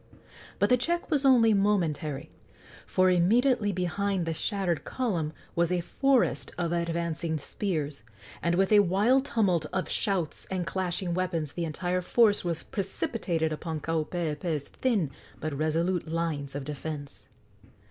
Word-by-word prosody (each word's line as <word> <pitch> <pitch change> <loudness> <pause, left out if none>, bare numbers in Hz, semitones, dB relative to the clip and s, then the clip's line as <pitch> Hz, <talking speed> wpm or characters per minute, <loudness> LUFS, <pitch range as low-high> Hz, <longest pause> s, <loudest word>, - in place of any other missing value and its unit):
But 205 - +2
the 250 - +5
check 340 +7 -1
was 285 -2 +2
only 235 -4 +6
momentary, 165 -8 0 0.6
for 185 0 +3
immediately 215 +5 +3
behind 185 +1 -1
the 165 - -1
shattered 180 -1 -1
column 180 -12 -1 0.2
was 170 0 +2
a 180 -1 +1
forest 270 +8 +1
of 170 -2 -1
advancing 170 -1 -1
spears, 150 -2 -3 0.4
and 170 0 +1
with 190 +2 +2
a 210 - +8
wild 205 +8 +3
tumult 185 - +1
of 185 - -1
shouts 185 -6 -1
and 185 -2 -2
clashing 180 -1 -2
weapons 170 -5 -1
the 170 +1 -3
entire 180 +3 -1
force 210 +3 +3
was 170 -2 -2
precipitated 185 -5 -2
upon 160 0 -4
Kaupeepee's 160 -1 -2
thin 210 - 0 0.3
but 155 -1 -3
resolute 160 +5 0
lines 155 -4 -2
of 145 - -3
defence. 145 0 -6
175 Hz, 135 wpm, -28 LUFS, 160-200 Hz, 0.6 s, a